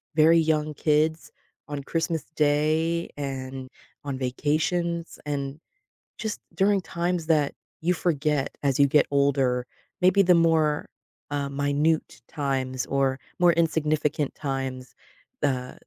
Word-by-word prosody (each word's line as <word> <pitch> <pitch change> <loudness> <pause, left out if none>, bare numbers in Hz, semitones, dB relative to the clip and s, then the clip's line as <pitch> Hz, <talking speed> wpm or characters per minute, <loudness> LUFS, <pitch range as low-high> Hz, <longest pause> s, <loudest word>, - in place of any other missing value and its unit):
very 160 +2 +6
young 155 -1 +1
kids 155 +2 +1 0.4
on 145 -2 -5
Christmas 165 -1 -1
Day, 155 +3 +1
and 130 -2 -5 0.3
on 140 -2 -3
vacations, 165 +6 -1
and 140 0 -3 0.6
just 220 -2 -4 0.2
during 195 0 +3
times 170 -1 -2
that 150 -3 +2 0.3
you 175 +3 +2
forget 150 -4 0
as 140 -1 +1
you 140 - +6
get 150 +2 +4
older, 135 -3 +2 0.3
maybe 185 +2 +5
the 180 0 +5
more, 160 -3 +2 0.4
uh, 140 -1 -1
minute 145 +2 0
times 130 -3 -2
or 135 -1 +1 0.2
more 175 -1 +5
insignificant 155 -3 0
times, 135 -3 -4 0.5
uh, 125 -3 0
150 Hz, 115 wpm, -26 LUFS, 140-165 Hz, 0.6 s, very